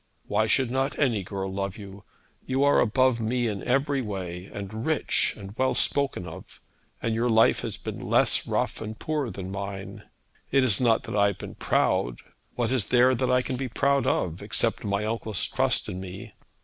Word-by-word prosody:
Why - - +1
should 130 -3 +2
not 135 +2 0
any 120 -8 +2
girl 95 0 -4
love 100 +1 -3
you? 100 -1 -11 0.4
You 130 +1 +1
are 145 0 +5
above 130 +1 +3
me 120 +2 0
in 105 -4 -2
every 140 +2 +1
way, 95 -4 -5
and 105 +3 -6
rich, 155 +1 +1
and 100 0 -9
well 130 +2 +1
spoken 140 -10 +1
of; - - -10 0.4
and 115 - +1
your 115 +2 +1
life 110 0 +5
has - - -4
been - - -6
less - - +2
rough - - -1
and 110 0 -5
poor 150 -5 -2
than 95 -3 -6
mine. 100 0 -6 0.5
It 135 -1 +4
is 115 -5 +2
not 115 -2 +3
that - - -5
I 100 -1 +5
have 100 - -2
been - - -8
proud. - - +1 0.4
What 120 -1 0
is 125 -6 0
there 125 +1 +5
that 130 0 0
I 125 0 +3
can 130 - -3
be 130 0 -2
proud 140 +2 +2
of 85 +1 0
except 110 +2 -1
my 100 0 -1
uncle's 110 -3 -2
trust - - +1
in 90 - -5
me? 95 +4 -8
110 Hz, 195 wpm, -26 LUFS, 100-130 Hz, 0.5 s, are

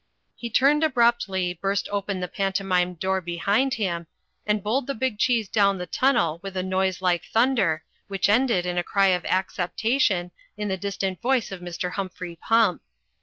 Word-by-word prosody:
He 235 - -6
turned 280 +7 +3
abruptly, 235 - +2
burst 195 +3 -1
open 200 -2 -2
the 180 - -2
pantomime 190 -2 0
door 190 +2 -1
behind 200 +10 0
him 170 -6 -2 0.4
and 210 -1 +1
bowled 245 +5 0
the 275 - -2
big 235 -3 -2
cheese 235 -4 +2
down 200 -1 +2
the 180 - -4
tunnel 170 - +1
with 195 -1 -7
a 185 - 0
noise 190 0 -1
like 175 -2 +2
thunder, 220 -10 +2 0.2
which 195 -1 0
ended 220 -4 +2
in 180 0 -1
a - - -1
cry 195 +2 +2
of 180 -1 +1
acceptation 190 +1 0 0.3
in 210 -1 -3
the 190 - 0
distant 195 -2 -3
voice 250 -4 +1
of 190 - -6
Mr. 175 0 -4
Humphrey 185 -2 -5
Pump. 225 +1 +2
195 Hz, 170 wpm, -24 LUFS, 180-225 Hz, 0.4 s, turned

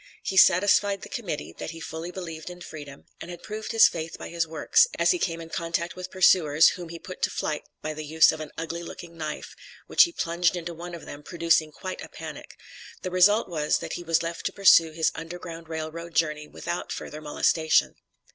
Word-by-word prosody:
He 190 - -3
satisfied 195 +2 +5
the - - -9
Committee 200 - -5
that - - -4
he 165 0 -8
fully 165 +1 -6
believed 170 -3 -7
in 180 0 -10
freedom, 145 -4 -10
and - - -8
had 175 -1 -9
proved 215 0 -5
his 225 -1 +7
faith 165 -1 -5
by - - -8
his 170 -1 -1
works, 160 - +3
as - - +4
he 360 - 0
came 165 - -1
in 165 0 -9
contact 170 +1 -2
with 185 0 -7
pursuers, 170 -4 +5
whom 175 -2 -7
he 170 - -7
put 185 +2 -10
to - - +2
flight 150 -1 -3 0.2
by 155 - -3
the 155 0 -6
use 155 +1 +5
of 160 - -6
an 155 -1 -6
ugly 165 +1 -4
looking 170 0 -9
knife, 155 -2 -6 0.3
which - - +6
he 340 - -7
plunged 170 - 0
into 170 -1 -5
one 170 +1 -7
of 170 - -10
them, 145 - -9
producing 165 -1 +1
quite 185 +4 -6
a - - -9
panic; - - -9 0.5
the 185 - -3
result 205 +5 +4
was 155 -4 0
that - - -6
he - - -4
was 165 -1 +1
left 165 0 -4
to - - -4
pursue 170 -4 +6
his 160 0 +1
Underground 165 0 -8
Rail 160 -1 -4
Road 170 0 -9
journey 150 -2 0
without 170 +3 -5
further 155 - -6
molestation. 160 +1 +2
165 Hz, 215 wpm, -26 LUFS, 160-180 Hz, 0.5 s, his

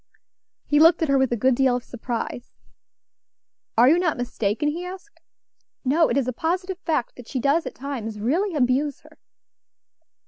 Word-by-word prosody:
He 295 - +2
looked 330 +1 +6
at 315 - 0
her 275 - +4
with 265 -2 +1
a 240 - 0
good 255 +4 +3
deal 255 0 +2
of 245 - -3
surprise. 240 0 -6 1.2
"Are 240 +2 +7
you 325 +6 +5
not 340 -4 0
mistaken?" 245 +2 -1
he 335 +4 -4
asked. 375 +3 -10 0.7
"No! 310 +5 +3
it - - 0
is 270 -3 0
a 255 - -1
positive 365 +6 -2
fact 310 -9 -2
that 245 -2 -11
she 265 - -3
does 280 +4 +1
at - - -7
times 235 -6 -5
really 330 - 0
abuse 270 +1 +1
her." - - -20
275 Hz, 175 wpm, -23 LUFS, 245-325 Hz, 1.2 s, Are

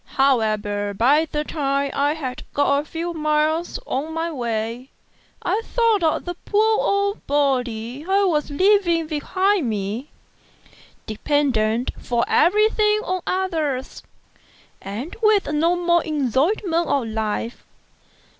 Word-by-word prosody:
However, 215 -6 +1
by 285 +9 +3
the 300 0 -1
time 280 -2 -1
I 285 +1 +1
had 260 -5 -5
got 285 0 +3
a 295 - -5
few 335 +2 -4
miles 310 +1 0
on 300 +5 -3
my 330 +1 -2
way, 235 -1 -3 0.5
I 445 - 0
thought 460 -4 +1
of 320 -2 +1
the 355 - -3
poor 430 +5 +1
old 400 +1 0
body 255 -3 -1
I 395 +1 +3
was 310 -6 +1
leaving 345 +1 +3
behind 350 - 0
me, 215 +6 -3 1.0
dependent 235 -1 0
for 235 -1 0
everything 425 +2 +3
on 370 0 -2
others, 320 -8 -2 0.8
and 220 - -6
with 430 -2 +4
no 330 +4 +2
more 345 -1 +2
enjoyment 320 - 0
of 275 -4 +1
life. 220 +1 -3
300 Hz, 120 wpm, -22 LUFS, 250-350 Hz, 1.0 s, with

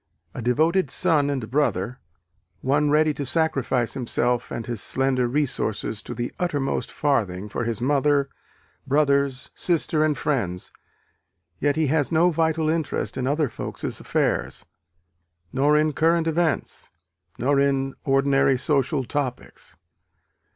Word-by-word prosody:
A - - -6
devoted 160 +10 +2
son 155 -6 +2
and 130 -6 -2
brother, 125 -4 0 0.6
one 145 +3 +2
ready 155 +1 +3
to 145 - -4
sacrifice 135 -4 0
himself 120 -1 -1
and 115 - -5
his 120 -4 -3
slender 130 -2 +1
resources 120 -6 -2
to 120 - -7
the 120 +1 -4
uttermost 145 -6 -1
farthing 105 -10 0
for 115 +3 -3
his 115 -2 -2
mother, 140 +1 +2 0.6
brothers, 140 -2 +1
sister 165 -2 +2
and 150 -2 +1
friends 100 - -2 0.9
yet 145 0 +1
he 160 0 +1
has 150 +1 +1
no 170 +2 +4
vital 160 -1 +1
interest 160 -2 -1
in 130 0 -2
other 150 +1 +1
folks' - - -6
affairs, - - -1 0.9
nor 145 +3 +3
in 155 0 +2
current 165 +2 +2
events, 165 -1 -1 0.5
nor 140 +3 +2
in 135 -1 +1
ordinary 135 -1 +3
social 140 0 +1
topics. 130 -1 -5
140 Hz, 130 wpm, -24 LUFS, 125-155 Hz, 0.9 s, no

